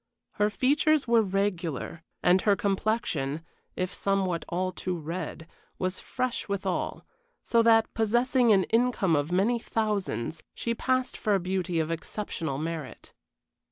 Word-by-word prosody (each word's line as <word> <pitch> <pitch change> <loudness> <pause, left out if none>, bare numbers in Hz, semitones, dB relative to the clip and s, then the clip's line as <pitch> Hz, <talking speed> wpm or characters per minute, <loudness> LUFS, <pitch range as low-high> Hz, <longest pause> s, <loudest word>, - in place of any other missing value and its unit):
Her 210 0 +4
features 285 +6 +2
were 230 -1 +5
regular, 185 - -2 0.2
and 180 +1 +5
her 205 -2 +4
complexion, 190 -8 -1 0.3
if 185 +1 -2
somewhat 190 -4 0
all 185 +2 -1
too 180 0 -3
red, 165 0 -5 0.3
was 185 0 -2
fresh 255 -4 -3
withal; 195 -2 -2 0.4
so 230 - +3
that, 225 -1 +4
possessing 240 +2 +3
an 195 -2 +5
income 230 -7 +2
of 145 +3 0
many 210 +7 +2
thousands, 200 - -2
she 235 - -1
passed 255 +2 0
for 210 -2 +1
a - - +2
beauty 180 -1 -1
of 160 0 -1
exceptional 165 -3 -4
merit. 160 -2 -5
195 Hz, 135 wpm, -28 LUFS, 170-225 Hz, 0.4 s, were